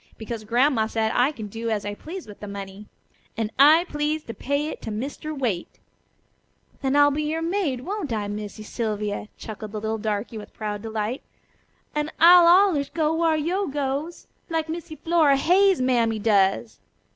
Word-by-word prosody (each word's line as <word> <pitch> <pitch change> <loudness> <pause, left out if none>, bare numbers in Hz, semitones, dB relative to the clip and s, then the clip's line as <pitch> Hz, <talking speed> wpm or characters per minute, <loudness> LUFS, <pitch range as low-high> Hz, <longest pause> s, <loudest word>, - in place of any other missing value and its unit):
Because 220 0 -6
Grandma 240 0 +2
said 220 0 0
I 255 +4 +3
could 215 -8 -8
do 230 +1 -4
as 210 -2 -1
I 205 - -3
pleased 330 - -8
with 205 - -12
the 210 - -7
money. 200 +1 -8 0.5
And 225 -1 -2
I 310 +5 +7
please 300 0 -2
to 230 - -7
pay 285 +5 -2
it - - -8
to - - -6
Mr. 280 +7 -5
Waite." 220 -10 -3 1.0
"Then 270 0 0
I'll 290 0 +6
be 295 +2 -1
your 315 +2 -2
maid, 330 -8 -1
won't 375 - -4
I, 210 -2 -2
Missy 210 +1 -6
Sylvia?" 210 -2 -3
chuckled 215 -1 -8
the 215 - -3
little 220 +1 -2
darky 215 +1 -3
with 210 - -12
proud 210 -1 -4
delight, 220 +2 -3 0.7
"an' 300 0 -1
I'll 345 +1 +8
allers 345 -6 +4
go 315 -1 0
whar 325 -1 +2
yo' 360 +6 -1
goes, 285 +4 -3 0.2
like 325 -1 -1
Missy 320 -1 -6
Flora 315 -4 +3
Hayes' 370 +3 +4
mammy 235 -3 +2
does." 205 +1 +1
260 Hz, 175 wpm, -24 LUFS, 215-310 Hz, 1.0 s, I'll